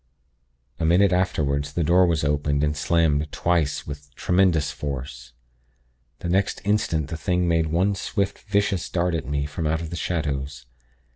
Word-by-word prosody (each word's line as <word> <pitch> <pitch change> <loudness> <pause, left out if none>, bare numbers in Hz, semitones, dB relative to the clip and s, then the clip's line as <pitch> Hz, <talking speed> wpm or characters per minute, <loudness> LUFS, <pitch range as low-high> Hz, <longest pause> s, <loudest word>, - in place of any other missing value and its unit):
"A - - -2
minute 90 +4 +4
afterward, 75 -6 +1
the 75 +4 -2
door 90 +3 +4
was 80 -3 0
opened 75 0 +1
and 75 0 +1
slammed 75 -1 +1
twice 85 -5 0
with 70 -1 -8
tremendous 90 -5 +2
force. 65 -3 -6 0.9
The - - -3
next 95 +2 +1
instant 85 -8 0
the 80 - -4
thing 90 0 0
made 80 -1 +2
one 90 +6 +1
swift, 100 0 -2
vicious 100 -3 0
dart 90 0 0
at 80 -6 -3
me, 70 0 -1
from 75 +2 -3
out 80 +1 0
of 80 -1 -6
the - - -4
shadows. 70 -6 -3
80 Hz, 160 wpm, -24 LUFS, 75-90 Hz, 0.9 s, minute